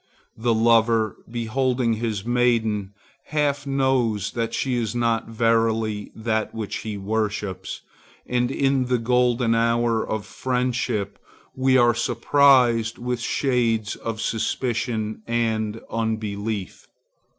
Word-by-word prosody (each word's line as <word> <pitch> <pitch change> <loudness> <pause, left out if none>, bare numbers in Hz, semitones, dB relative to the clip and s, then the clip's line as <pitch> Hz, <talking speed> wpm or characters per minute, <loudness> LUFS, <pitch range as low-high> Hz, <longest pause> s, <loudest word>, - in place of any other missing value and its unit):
The 115 0 +1
lover, 115 -1 +3
beholding 120 +1 0
his 110 -2 -3
maiden, 115 -5 +1 0.3
half 145 -2 -1
knows 130 -7 +1
that 115 -1 -2
she 130 +2 -1
is 120 -2 -1
not 115 -2 0
verily 115 -2 +1
that 110 -1 -2
which 110 -2 -4
he 105 0 -5
worships; 100 -2 -3 0.4
and 125 0 0
in 135 -1 +1
the 125 0 +1
golden 120 0 +2
hour 115 0 +2
of 110 -2 -3
friendship 125 -2 -2 0.4
we 130 0 +3
are 120 -1 +5
surprised 120 -1 +3
with 125 0 -3
shades 115 -6 0
of 115 -1 -5
suspicion 110 -1 -2
and 110 -2 -1
unbelief. 110 -3 -3
115 Hz, 110 wpm, -23 LUFS, 110-125 Hz, 0.4 s, are